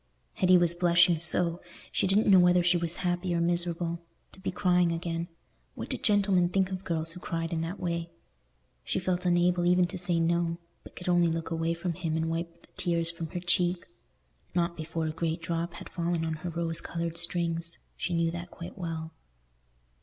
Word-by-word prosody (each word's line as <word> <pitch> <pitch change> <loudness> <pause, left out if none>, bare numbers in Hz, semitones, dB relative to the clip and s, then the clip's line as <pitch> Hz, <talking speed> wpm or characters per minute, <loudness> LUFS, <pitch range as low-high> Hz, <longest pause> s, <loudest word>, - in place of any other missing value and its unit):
Hetty 185 0 +5
was 175 -1 +3
blushing 175 -1 +4
so, 170 0 +3 0.3
she - - +1
didn't 200 +3 +3
know 195 -2 +7
whether 180 0 +5
she 175 +1 +4
was 170 -1 +1
happy 175 0 0
or - - +1
miserable. 170 0 0 0.3
To - - -17
be 190 - -3
crying 180 -2 +2
again—what 165 0 -6
did - - -3
gentlemen 200 -5 +3
think 190 0 +1
of 185 0 -4
girls 165 -2 -1
who 180 - -9
cried 165 -1 -3
in 160 - -1
that 170 +5 -4
way? 170 -1 -2 0.7
She - - -2
felt 180 0 -1
unable 175 0 +3
even 180 +1 +4
to 175 +1 -5
say 175 -1 +2
"no," 170 0 +1 0.2
but - - -15
could 180 - -8
only 175 -1 +4
look 165 0 -2
away 165 0 0
from 170 +1 -3
him 165 -2 -2
and 160 0 -1
wipe 170 0 -5
the - - -7
tears 170 -1 +1
from 165 -1 -6
her 175 - -5
cheek. 175 0 +1 0.7
Not 170 0 +1
before 160 0 -3
a 155 - -1
great 165 +1 -2
drop 170 +1 -3
had - - -9
fallen 170 -1 -1
on 160 - -1
her 180 - -3
rose 165 -1 -2
coloured 170 0 -4
strings—she 170 +1 -3
knew 165 0 +1
that 175 +1 -6
quite 170 +3 -9
well. 165 -2 -4
170 Hz, 190 wpm, -29 LUFS, 165-180 Hz, 0.7 s, know